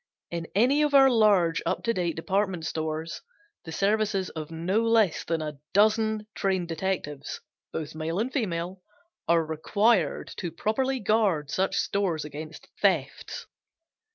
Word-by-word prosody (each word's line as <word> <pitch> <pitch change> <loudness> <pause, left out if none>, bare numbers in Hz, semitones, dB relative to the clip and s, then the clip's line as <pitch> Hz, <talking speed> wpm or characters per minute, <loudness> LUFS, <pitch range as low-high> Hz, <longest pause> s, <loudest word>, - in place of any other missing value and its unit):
In 170 -1 -4
any 255 +8 +4
of 295 -1 +2
our 270 -1 +8
large 200 -8 +4
up - - -1
to 230 - +1
date 175 -5 -1
department 190 -1 -1
stores 160 0 -3 0.4
the 160 - -7
services 200 +1 +1
of 155 -2 -6
no 170 +6 0
less 225 -6 +3
than 165 -1 -1
a 150 -2 -6 0.2
dozen 215 +1 +3
trained 185 -3 -1
detectives, 160 -5 -3 0.3
both 155 -3 -5
male 160 +2 -3
and 240 +5 -1
female, 185 - -2 0.5
are 165 -1 +3
required 200 +8 +1
to 175 - -4
properly 260 +9 0
guard 200 - +1
such 190 +1 0
stores 180 -7 0
against 155 +1 -8
thefts. 165 -9 0
185 Hz, 140 wpm, -27 LUFS, 160-215 Hz, 0.5 s, our